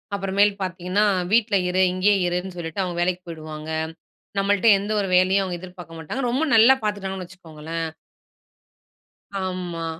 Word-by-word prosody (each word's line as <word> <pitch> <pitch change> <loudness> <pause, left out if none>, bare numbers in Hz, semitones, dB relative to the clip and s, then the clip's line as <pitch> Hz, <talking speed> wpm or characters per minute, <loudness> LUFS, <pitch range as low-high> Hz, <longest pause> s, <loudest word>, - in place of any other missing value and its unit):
அப்புறமேல் 200 +1 +2
பாத்தீங்கன்னா, 185 +2 0 0.3
வீட்ல 220 -2 +3
இரு 185 +1 +2
இங்கேயே 200 +2 +3
இருன்னு 180 +1 -3
சொல்லிட்டு 170 +2 -3
அவங்க 175 -2 -4
வேலைக்கு 180 +1 0
போயிடுவாங்க. 155 -1 -8 0.7
நம்பள்ட்ட 200 +2 +2
எந்த 205 +2 -4
ஒரு 200 - -1
வேலையும் 190 +2 +3
அவுங்க 175 -2 -4
எதிர்பார்க்க 180 -3 -10
மாட்டாங்க, 210 - -4
ரொம்ப 260 +6 0
நல்லா 225 +4 +8
பாத்துட்டாங்கன்னு 195 -3 -3
வச்சுக்கோங்களேன். 165 -2 -6 1.6
ஆமா. 180 -3 -4
185 Hz, 130 wpm, -23 LUFS, 175-200 Hz, 1.6 s, நல்லா